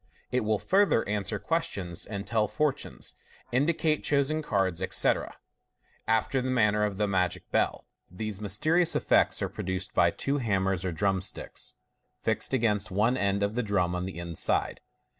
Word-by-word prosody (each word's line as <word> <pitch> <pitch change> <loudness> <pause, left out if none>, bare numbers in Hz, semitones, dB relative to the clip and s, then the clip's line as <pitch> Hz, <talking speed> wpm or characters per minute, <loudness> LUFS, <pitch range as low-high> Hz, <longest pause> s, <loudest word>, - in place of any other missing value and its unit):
It 125 - +2
will 110 -1 +1
further 195 - +2
answer 105 0 -1
questions 100 - -2
and 100 -1 -5
tell 110 -2 +1
fortunes, 150 +5 -2 0.4
indicate 155 +4 +1
chosen 145 +2 +1
cards, 95 - 0
etc., - - +1 0.7
after 115 +4 +1
the 130 - -2
man 110 -5 +3
ner 105 0 +1
of 100 -2 -3
the 105 0 +1
magic 90 -3 -1
bell. - - 0 0.2
These 105 +2 -5
mysterious 155 - +2
effects - - +3
are - - +1
produced 95 0 -4
by - - +4
two 140 +1 -1
hammers 95 -6 0
or 95 - -1
drum 95 +2 0
sticks, - - -6 0.4
fixed - - -1
against 110 -5 +1
one 110 +6 +2
end 100 -3 +1
of 100 +1 0
the 125 - 0
drum 100 -5 0
on 90 0 -2
the 95 - -7
inside. 85 -2 -1
105 Hz, 160 wpm, -28 LUFS, 95-130 Hz, 0.7 s, by